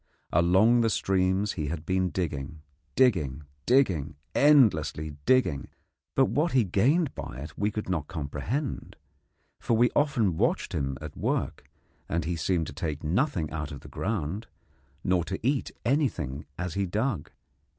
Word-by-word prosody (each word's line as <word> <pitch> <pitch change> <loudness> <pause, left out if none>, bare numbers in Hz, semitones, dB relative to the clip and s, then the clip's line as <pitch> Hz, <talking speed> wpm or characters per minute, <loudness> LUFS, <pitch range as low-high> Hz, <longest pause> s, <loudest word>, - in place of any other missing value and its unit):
Along 95 +8 +5
the 115 - +3
streams 95 0 +1
he 75 -4 -3
had 80 +1 -4
been 95 +1 +1
digging, 75 -2 -4 0.3
digging, 80 - +2 0.2
digging, 95 - +2 0.2
endlessly 100 - +4 0.2
digging, 130 - +3 0.5
but - - +5
what 150 - 0
he 130 -3 +5
gained 130 - +2
by 70 -4 -7
it 75 +3 -8
we 105 +1 0
could 105 0 -4
not 85 -6 -2
comprehend; 90 - -4 0.6
for 115 - +1
we 120 +1 +4
often 120 - +2
watched - - 0
him 70 -1 -2
at - - -7
work, - - -2 0.4
and 85 -1 -1
he 85 +1 -1
seemed 85 +1 0
to - - -7
take 75 -1 -4
nothing 90 - 0
out 80 0 -4
of 70 - -8
the - - -12
ground, 100 +1 -3 0.6
nor 90 -2 +2
to 95 - -4
eat 135 0 +1 0.2
anything 100 - 0
as 90 -1 -3
he 100 +1 -1
dug. 105 - -1
95 Hz, 150 wpm, -28 LUFS, 75-115 Hz, 0.6 s, Along